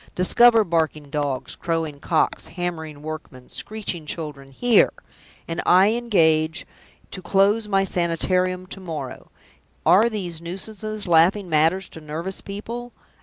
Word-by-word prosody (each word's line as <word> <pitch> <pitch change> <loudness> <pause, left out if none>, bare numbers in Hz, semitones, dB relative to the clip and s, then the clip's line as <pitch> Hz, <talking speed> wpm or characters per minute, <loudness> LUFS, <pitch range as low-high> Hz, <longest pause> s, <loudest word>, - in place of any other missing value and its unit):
Discover 230 +5 +6
barking 160 -5 -1
dogs, 145 -4 -2
crowing 165 -4 -3
cocks, 160 +2 0
hammering 160 -5 -5
workmen, 155 -5 -8
screeching 190 -7 -4
children 150 -4 -6
here 235 - +4 0.6
and 165 0 -3
I 190 +4 +5
engage 160 -9 +2 0.5
to 185 - -5
close 200 +4 +2
My 195 -1 +2
Sanitarium 180 +1 0
to 195 - -7
morrow! 155 -8 -7 0.6
Are 215 +6 +6
these 180 -7 -5
nuisances 210 +4 -5
laughing 175 +3 +3
matters 165 +5 +2
to 160 - -11
nervous 165 +5 -5
people? 235 +4 -7
175 Hz, 120 wpm, -23 LUFS, 155-200 Hz, 0.6 s, Discover